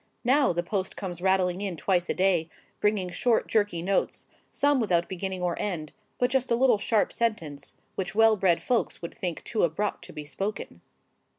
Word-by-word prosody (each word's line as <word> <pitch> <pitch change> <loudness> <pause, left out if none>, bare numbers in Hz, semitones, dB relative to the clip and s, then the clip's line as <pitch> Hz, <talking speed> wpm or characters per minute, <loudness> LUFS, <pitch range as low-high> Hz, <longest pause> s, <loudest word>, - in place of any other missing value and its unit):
Now 265 +3 +4
the 175 0 -1
post 190 0 -2
comes 175 -3 -6
rattling 190 -1 +2
in 195 -4 -3
twice 175 +3 +1
a - - 0
day, 180 -4 +2 0.3
bringing 210 -3 +1
short 235 +4 +1
jerky 205 -6 +1
notes, 195 +2 0 0.2
some 285 -1 +2
without 175 -7 +1
beginning 190 0 -4
or 175 -1 0
end, 165 -7 -3 0.2
but 245 0 +1
just 265 -1 +1
a 235 - +3
little 240 -3 +4
sharp 215 +1 +1
sentence, 165 -12 -2 0.2
which 195 +1 -4
well 225 0 +6
bred 185 -4 +2
folks 245 -7 -1
would 170 - -5
think 175 -3 -4
too 225 - -1
abrupt 175 +5 -1
to - - -11
be 150 - -7
spoken. 195 - -5
190 Hz, 185 wpm, -27 LUFS, 175-220 Hz, 0.3 s, well